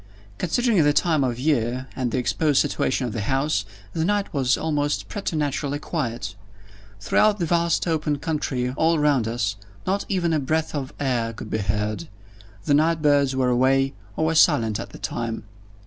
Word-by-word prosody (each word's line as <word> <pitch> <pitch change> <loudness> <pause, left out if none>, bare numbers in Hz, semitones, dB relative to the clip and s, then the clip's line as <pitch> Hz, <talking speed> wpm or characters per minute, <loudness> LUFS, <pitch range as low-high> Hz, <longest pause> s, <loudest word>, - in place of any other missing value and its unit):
Considering 210 0 +2
the 145 0 +4
time 155 -2 +2
of 120 -2 -1
year, 130 -3 0
and 130 -2 -1
the 130 - -2
exposed 135 +4 +2
situation 130 0 0
of 120 - -4
the 115 - -2
house, 135 -1 0 0.3
the 160 - -1
night 205 +2 0
was 130 -3 +2
almost 145 -2 -1
preternaturally 150 -7 -2
quiet. 120 - -3 0.7
Throughout 210 - +3
the 175 - -1
vast 170 +1 +1
open 155 -3 0
country 140 -5 -2
all 160 +5 +2
round 145 -6 +2
us, 110 -3 -1 0.3
not 195 +2 0
even 175 -4 +1
a 155 - +2
breath 155 +3 -1
of 140 -3 -3
air 120 -5 0
could 110 - -9
be 110 - 0
heard. 105 -2 -2 0.6
The 145 - +2
night 160 +2 +2
birds 140 -2 +3
were 130 -1 +2
away, 135 +2 +3 0.2
or 160 - +1
were 160 - +1
silent 120 -10 +4
at - - -6
the - - -11
time. 115 -1 -4
145 Hz, 175 wpm, -24 LUFS, 125-160 Hz, 0.7 s, the